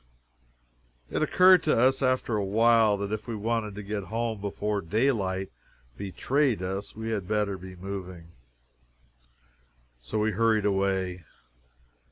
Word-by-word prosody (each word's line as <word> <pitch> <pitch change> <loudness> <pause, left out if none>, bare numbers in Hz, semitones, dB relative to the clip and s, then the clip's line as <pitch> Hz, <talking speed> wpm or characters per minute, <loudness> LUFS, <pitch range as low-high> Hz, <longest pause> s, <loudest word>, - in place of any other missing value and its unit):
It - - -1
occurred 185 +3 +6
to 155 - +1
us, 130 +3 +3
after 130 -3 +1
a 105 - 0
while, 110 +1 +4
that 100 0 -4
if 110 +1 -4
we 115 - -3
wanted 110 -1 -2
to 105 - -7
get 100 -1 -4
home 115 -1 -3
before 105 0 -2
daylight 95 -2 0 0.4
betrayed 115 +3 0
us, 95 +2 -4
we 110 +1 -4
had 100 -5 -3
better 105 -1 0
be 95 0 -10
moving. 90 -2 -7 1.7
So 60 - -4
we 110 +1 +1
hurried 110 0 +2
away. 95 -3 0
105 Hz, 135 wpm, -27 LUFS, 95-115 Hz, 1.7 s, occurred